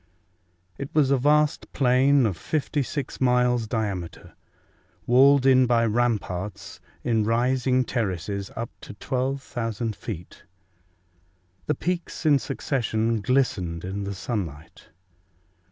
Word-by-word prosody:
It 140 - -4
was 140 -3 +4
a 140 - +4
vast 150 +2 +2
plain 135 +1 +4
of 100 -5 0
56 145 - -3
miles 125 -2 +2
diameter, 100 -7 -4 0.7
walled 135 +2 +5
in 130 -1 +5
by 115 -1 +3
ramparts, 105 -4 -2 0.2
in 115 -2 +1
rising 125 +3 +2
terraces 100 -4 -3
up 115 0 -4
to - - -10
12,000 120 -4 -3
feet. 90 -6 -8 1.3
The 150 - +1
peaks 175 +2 -3
in 145 -3 +5
succession 115 -5 -1
glistened 95 -9 0
in 100 +2 -4
the 100 0 -4
sunlight. 85 - -6
120 Hz, 105 wpm, -25 LUFS, 105-135 Hz, 1.3 s, walled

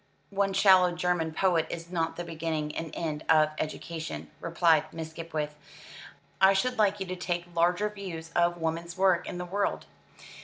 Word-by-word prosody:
"One 200 0 +1
shallow 190 -2 +6
German 175 -2 0
poet 170 -1 +2
is 170 +1 -6
not 165 -2 -1
the 175 - -4
beginning 160 -2 -3
and 165 0 -4
end 155 -2 -3
of 155 -1 +6
education," 160 +1 -5
replied 165 -2 +2
Miss 160 -1 -6
Skipwith. 160 -2 -4 0.9
"I 190 0 +7
should 250 +5 0
like 205 -1 +3
you 190 - -2
to 185 0 -4
take 175 -1 -4
larger 175 +4 +2
views 185 -6 -7
of 175 0 +3
woman's 170 +1 -3
work 185 -2 +3
in - - -5
the 180 - -4
world." 200 +3 -1
170 Hz, 165 wpm, -28 LUFS, 160-185 Hz, 0.9 s, I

